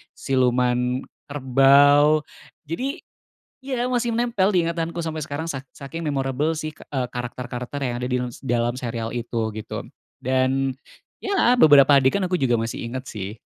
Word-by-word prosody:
siluman 125 -1 +1 0.3
kerbau. 145 +2 +5 0.5
Jadi 270 - -3 0.6
iya, 255 -2 -1
masih 245 -1 0
menempel 230 -4 +1
di 185 - +3
ingatanku 170 0 -3
sampai 160 -2 -3
sekarang, 145 +3 -5
sak 135 -5 -4
saking 140 +5 -7
memorable 140 +1 0
sih, 155 0 -4
eee, 130 -3 -4
karakter-karakter 125 +2 -5
yang 125 -3 -2
ada - - -1
dins 125 -1 -2
dalam 120 -1 0
serial 115 -3 -4
itu, 115 -2 -2
gitu. 110 - -6 0.4
Dan, 130 +1 +1 0.5
ya 390 -12 +3
beberapa 145 -3 +8
adegan 135 +10 +2
aku 180 - 0
juga 120 -3 +2
masih 115 +1 -4
ingat 130 +1 -6
sih. 105 +1 -6
135 Hz, 140 wpm, -23 LUFS, 125-160 Hz, 0.6 s, beberapa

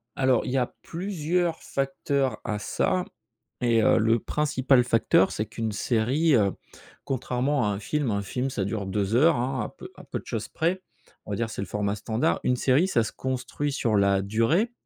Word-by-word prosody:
Alors, 130 -3 +2
il - - -3
y 135 - +1
a 125 - 0
plusieurs 175 -1 -1
facteurs 135 -2 -1
à 105 -1 -2
ça 180 +10 0 0.6
et 115 -2 +3
heu, - - +5
le 115 +1 +3
principal 135 -2 +2
facteur, 115 -5 +3
c'est 110 - -2
qu'une 115 0 -4
série, 125 +9 +1
heu, 100 -4 +3 0.5
contrairement 130 0 0
à - - +1
un 100 -1 -2
film 145 +5 -1
un 100 0 0
film, 125 +7 -2
ça 105 -7 -2
dure 105 -1 -3
2 100 +3 -1
heures, 160 +6 +5
hein, 130 +1 -1
à - - -6
peu - - -9
à - - -13
peu - - -5
de - - -16
choses - - -4
près, 180 +4 -1 0.4
on - - -7
va 100 - -1
dire, 115 -1 -1
c'est 100 - -5
le 100 - -4
format 105 +1 -1
standard. 110 +3 0
Une 125 - +2
série, 135 +8 +3
ça 120 -11 +2
se 110 - -5
construit 130 +3 -3
sur 115 -6 0
la 100 -1 +3
durée. 115 - +1
125 Hz, 200 wpm, -26 LUFS, 110-140 Hz, 0.6 s, heu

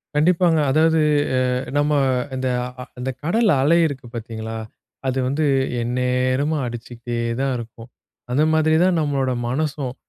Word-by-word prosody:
கண்டிப்பாங்க. 165 +1 +3
அதாவது 160 +2 +3 0.4
அ - - +3 0.4
நம்ம 145 +1 +2 0.4
இந்த 130 0 -2 0.3
அ - - -5 0.2
அந்த 130 - -3
கடல் 215 +7 +2
அலை 160 +5 +4
இருக்கு 135 -4 -7
பாத்தீங்களா, 110 -1 -6 0.5
அது 130 0 0
வந்து 145 +4 0 0.4
எந்நேரமும் 125 +4 0
அடிச்சுக்கிட்டே 120 0 -6 0.2
தான் 135 0 0
இருக்கும். 115 0 -10 0.4
அந்த 145 +5 +3
மாதிரி 155 0 +3
தான் 185 -1 +3
நம்மளோட 140 -4 0 0.2
மனசும், 140 -2 -2
135 Hz, 130 wpm, -21 LUFS, 125-155 Hz, 0.5 s, அலை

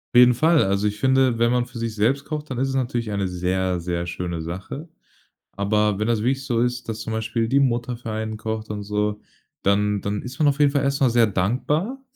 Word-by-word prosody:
Auf - - +9
jeden 125 0 +8
Fall. 160 +5 +4
Also, 100 +2 +1
ich 105 0 -3
finde, 130 -3 +3
wenn 120 +1 +3
man 125 -1 +2
für 120 - -11
sich 115 -1 -3
selbst 125 +7 +1
kocht, 150 -1 -5
dann 130 - -4
ist 135 +1 0
es - - -2
natürlich 120 -4 -1
eine 100 -2 -1
sehr, 90 0 -1
sehr 85 0 -2
schöne 85 -1 -4
Sache. 95 - -6 0.7
Aber 105 +1 +1
wenn 105 - 0
das 115 -2 +2
wirklich 135 +3 0
so 120 -3 +1
ist, 125 -1 -1
dass 110 0 -4
zum 110 - -5
Beispiel 115 +1 -1
die 140 +1 +4
Mutter 120 -2 0
für 115 -2 -6
einen 110 0 -3
kocht 110 0 -4
und 105 -1 -4
so, 105 0 -1 0.4
dann 105 +1 +2
dann 105 0 -2
ist 125 +3 -9
man 150 - +4
auf 140 +1 -1
jeden 145 -1 +5
Fall 140 -1 +1
erst 140 0 0
mal 130 - +5
sehr 115 -1 +4
dankbar 145 - -1
115 Hz, 235 wpm, -23 LUFS, 105-130 Hz, 0.7 s, Auf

